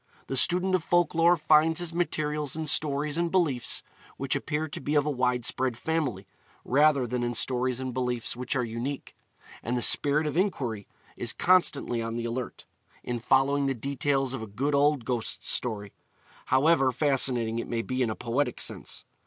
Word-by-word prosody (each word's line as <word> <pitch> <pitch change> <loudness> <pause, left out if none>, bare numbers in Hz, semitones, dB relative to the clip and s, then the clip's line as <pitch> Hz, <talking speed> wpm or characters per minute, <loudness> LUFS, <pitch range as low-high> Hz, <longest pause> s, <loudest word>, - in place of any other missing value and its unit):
The 135 - -4
student 180 +8 +4
of 185 -3 +2
folk 175 0 +2
lore 170 +2 +4
finds 155 +1 +3
his 175 -1 -4
materials 150 -4 -1
in 160 0 -3
stories 150 +1 0
and 170 0 +1
beliefs 160 -10 0 0.3
which 135 -1 -1
appear 155 +1 -2
to - - -7
be 145 +3 -2
of 145 -1 +3
a 150 - 0
widespread 125 -1 0
family, 135 -11 -2 0.4
rather 140 0 +3
than 125 +1 -2
in 120 0 -2
stories 125 +1 0
and 130 -1 -4
beliefs 125 -2 -2
which 125 +2 -3
are 125 - +1
unique; 120 +5 -5 0.5
and 120 +2 -2
the - - -1
spirit 145 +2 +3
of 150 - -2
inquiry 130 - -1 0.3
is 120 -2 -2
constantly 160 -9 +2
on 115 0 -4
the 120 0 -3
alert, 120 +2 -5 0.4
in 120 -1 -3
following 135 +3 +2
the 135 - 0
details 135 +1 -1
of 135 - -4
a 110 - -6
good 135 +9 -2
old 140 -3 +2
ghost 120 -2 -3
story, 105 -5 -2 0.5
however 135 0 +3
fascinating 125 -4 +1
it - - -5
may 115 -1 -2
be 130 +2 -2
in 120 - +1
a 110 - -3
poetic 125 +5 -2
sense. - - -4
135 Hz, 180 wpm, -27 LUFS, 120-150 Hz, 0.5 s, student